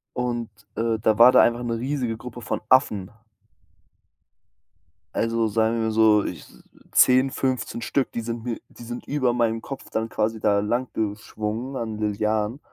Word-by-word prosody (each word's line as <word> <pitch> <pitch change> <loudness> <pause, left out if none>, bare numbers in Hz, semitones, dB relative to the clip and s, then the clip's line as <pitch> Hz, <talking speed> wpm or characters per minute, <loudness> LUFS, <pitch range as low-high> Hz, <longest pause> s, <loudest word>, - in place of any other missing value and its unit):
Und, 120 -2 -2 0.3
äh, 115 -1 0
da 110 0 +2
war 120 +2 +9
da - - +7
einfach 120 +1 +2
'ne 115 -1 -2
riesige 125 -2 -2
Gruppe 120 0 -9
von - - -3
Affen. 105 -8 +3 2.0
Also 115 0 +1
sagen 110 +2 +1
wir 110 - 0
so 110 -1 +4
ich - - -6 0.4
10, 130 +1 +5
15 130 -3 -2
Stück, 130 +3 0
die 115 - -3
sind 115 0 -5
mir 120 -2 -3
die - - -14
sind 120 +1 -7
über 130 -4 +1
meinem 115 -2 +1
Kopf 135 +3 -8
dann 110 +1 -2
quasi 110 0 -1
da 100 -1 +3
lang 120 +5 -1
geschwungen 110 +4 -3
an 110 -3 -4
Lianen. 105 +3 -1
115 Hz, 160 wpm, -24 LUFS, 110-125 Hz, 2.0 s, war